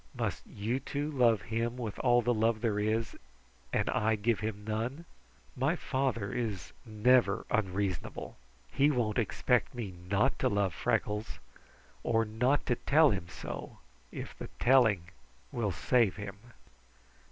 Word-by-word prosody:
Must - - -3
you 110 +6 -2
two 145 +3 -3
love 120 - +3
him 115 +4 -2
with 115 -5 -5
all 120 -1 +4
the 120 +2 +2
love 110 0 +1
there 110 -3 0
is, 110 +2 0 0.6
and - - +1
I 110 +1 +2
give 110 0 0
him 105 -1 -4
none? 120 +9 -3 0.5
My 135 +6 +1
father 130 - -1
is 105 -9 -3
never 120 +4 +3
unreasonable. 95 -5 -2 0.4
He 140 +2 +4
won't 120 -5 +1
expect 120 +5 +1
me 110 -6 -5 0.2
not 100 +1 +2
to - - +2
love 100 -4 +1
Freckles, 105 +7 -1 0.6
or 115 0 +2
not 125 +6 +1
to 120 - +1
tell 150 +3 +5
him 95 -4 -3
so, - - -7 0.3
if - - -7
the - - -7
telling 120 -8 +4 0.5
will 110 -5 -1
save 110 +3 +2
him." 105 -2 -7
115 Hz, 140 wpm, -31 LUFS, 105-125 Hz, 0.6 s, tell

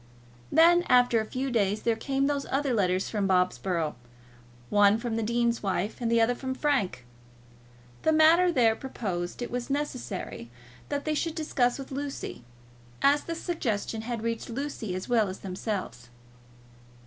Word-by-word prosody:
Then, 345 +2 +6
after 245 -2 +5
a - - -4
few 260 +3 -3
days, 210 -2 +1
there 230 -1 +2
came 270 +4 -1
those 285 -1 -1
other 275 -1 0
letters 185 -3 +1
from 205 -3 -1
Bobsborough, 180 -3 +1 0.8
one 205 0 +5
from 230 -1 -3
the 225 - 0
dean's 235 +1 0
wife 200 +3 -2
and 230 -1 0
the 230 - +4
other 230 +2 +3
from 260 +1 -4
Frank. 205 - 0 1.0
The 315 - +3
matter 325 +3 +5
there 230 -7 +3
proposed 195 -6 -4
it 240 - -6
was 245 +1 -3
necessary 255 - -4 0.4
that 285 -1 -2
they 310 - 0
should 320 +1 -1
discuss 250 -6 +1
with 275 -1 -8
Lucy, 275 - -5 0.6
as 285 +1 +4
the 335 - -3
suggestion 230 - -2
had 230 -1 -4
reached 230 0 -3
Lucy 235 -6 -4
as 185 - -5
well 225 -5 +2
as 185 - -8
themselves. 185 - -5
235 Hz, 160 wpm, -28 LUFS, 205-275 Hz, 1.0 s, Then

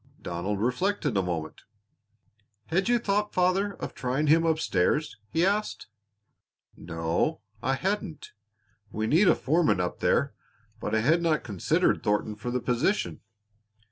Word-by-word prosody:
Donald 95 +4 -3
reflected 145 - 0
a 95 - +3
moment. 85 -4 -4 1.1
"Had 190 +7 +1
you 245 - +4
thought, 210 -2 -1
father, 185 +2 +2
of - - -6
trying 130 +4 -1
him 165 +2 +4
up 160 -1 +2
stairs?" 150 - 0
he 165 +7 +2
asked. 205 - -1 0.9
"No, 85 - -2 0.2
I 135 +2 +1
hadn't. 190 -1 -3 0.6
We 110 +1 -2
need 165 - +4
a - - +6
foreman 155 - +2
up 90 -1 -2
there, - - +1 0.5
but - - -2
I 110 - +2
had 160 +9 +3
not 165 -2 +1
considered 100 -6 +1
Thornton 105 +1 0
for 110 +3 -6
the 125 +1 -1
position. 125 - 0
150 Hz, 140 wpm, -27 LUFS, -, 1.1 s, a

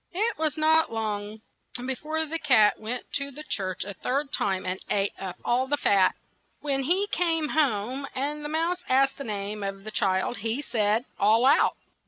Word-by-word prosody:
It 435 +5 +1
was 310 -1 0
not 315 -1 +4
long 215 -1 -3 0.4
be 255 +2 -3
fore 315 +4 -2
the 325 +2 -3
cat 220 -9 +4
went 235 +3 -5
to 280 0 -4
the 290 +2 -8
church 190 -11 -2
a 200 - -5
third 275 +7 -2
time, 190 -2 0
and 185 +1 -2
ate 200 0 +1
up 190 -2 -5
all 250 +2 +2
the 290 +2 +1
fat. 195 -7 +3 0.4
When 275 -2 -1
he 360 +9 +2
came 325 -4 +1
home 265 -2 0
and 295 +3 -2
the 295 - -4
mouse 335 +3 -1
asked 270 +1 +3
the - - -3
name 210 -1 -4
of 195 0 -4
the 215 - -6
child, 190 +3 0
he 225 +7 -2
said, 220 -1 +1
"All 220 +4 +4
out." 280 +3 +4
255 Hz, 190 wpm, -27 LUFS, 205-300 Hz, 0.4 s, not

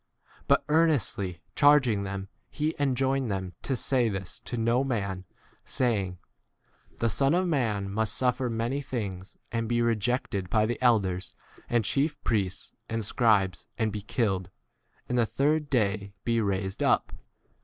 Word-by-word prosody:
But, 140 - +3
earnestly 130 - +1
charging 140 -8 +5
them, 95 0 -4 0.2
he 155 +1 -1
enjoined 135 -2 +1
[them] 95 -2 -3
to 135 - -1
say 125 -1 +1
this 95 -3 -4
to 120 - -3
no 115 +3 +2
man, 100 -8 -2 0.4
saying, 100 -7 0 0.7
22 - - -30
The 115 - +1
Son 135 +6 +2
of 185 +1 +2
man 115 - 0
must 110 +2 0
suffer 125 0 +1
many 120 +5 -1
things, 100 -8 -5
and 115 -1 -2
be 120 0 +2
rejected 115 -4 0
by 110 +2 +3
the 120 +3 -3
elders 100 -7 +2 0.3
and 120 -3 +2
chief 145 +7 +1
priests 100 -5 -1 0.2
and 115 -1 -2
scribes, 100 -5 +2
and 110 -2 0
be 105 0 -4
killed, 95 -4 -1 0.6
and 125 - 0
the 115 - +3
23 110 - -29
third 150 +2 +2
day 100 -5 0
be 115 -1 +1
raised 95 -1 -2
up. - - +2
115 Hz, 155 wpm, -28 LUFS, 100-130 Hz, 0.7 s, charging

